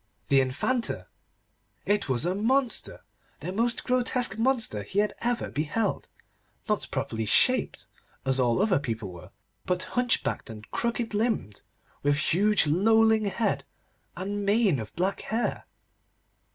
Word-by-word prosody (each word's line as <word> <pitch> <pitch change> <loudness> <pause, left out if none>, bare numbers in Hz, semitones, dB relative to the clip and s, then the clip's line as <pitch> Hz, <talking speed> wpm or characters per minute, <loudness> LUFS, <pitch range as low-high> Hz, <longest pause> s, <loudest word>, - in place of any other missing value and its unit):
The 135 -1 +5
Infanta! 230 - -1 0.8
It 205 -6 +1
was 130 +3 +1
a 180 - +1
monster, 240 +5 0 0.4
the 180 - -5
most 235 +4 0
grotesque 250 -4 0
monster 230 - 0
he 100 - -7
had 210 +1 +2
ever 240 0 -1
beheld. 160 +9 -1 0.6
Not - - 0
properly 110 0 -2
shaped, - - +3 0.4
as 130 0 +3
all 125 +8 +3
other 200 -8 +3
people 110 -7 -4
were, 85 -2 -11 0.4
but 180 0 -1
hunchbacked, 245 - 0
and 110 -1 -9
crooked 235 -1 -2
limbed, 210 - -1 0.4
with 145 0 +2
huge 200 +6 +3
lolling 220 +7 +4
head 205 +1 0 0.5
and 200 +2 -3
mane 200 - +3
of 110 -2 -6
black 190 +3 0
hair. 225 +2 -2
200 Hz, 130 wpm, -27 LUFS, 145-230 Hz, 0.8 s, The